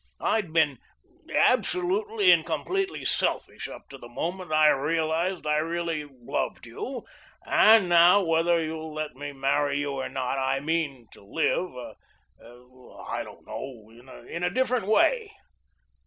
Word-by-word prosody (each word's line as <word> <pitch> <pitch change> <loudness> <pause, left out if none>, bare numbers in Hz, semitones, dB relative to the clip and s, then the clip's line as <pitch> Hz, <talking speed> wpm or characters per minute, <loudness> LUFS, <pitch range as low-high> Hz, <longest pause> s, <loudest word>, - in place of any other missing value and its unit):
I'd 210 -7 0
been 155 -6 +2 0.5
absolutely 400 +3 +2
and - - +5
completely 385 0 -2
selfish - - -1
up - - -11
to 135 - -11
the 120 - -11
moment 175 +7 -4
I 155 0 +5
realised 160 +5 0
I 150 0 +2
really 165 -1 -2
loved 125 -3 -4
you, 240 - -6 0.4
and 220 -3 +6
now, 175 +3 +6
whether 165 0 +2
you'll 160 -1 -5
let 155 0 -4
me 145 +2 -6
marry 140 +1 0
you 145 0 -2
or 135 -1 -4
not, 130 +1 -2
I 135 0 0
mean 145 -4 -2
to - - -16
live 125 - -2 0.5
I 125 +2 -9
don't - - -14
know, 115 -5 -8 0.4
in 170 - -5
a 175 - +2
different 250 -4 0
way. 430 - +2
160 Hz, 140 wpm, -26 LUFS, 135-185 Hz, 0.5 s, and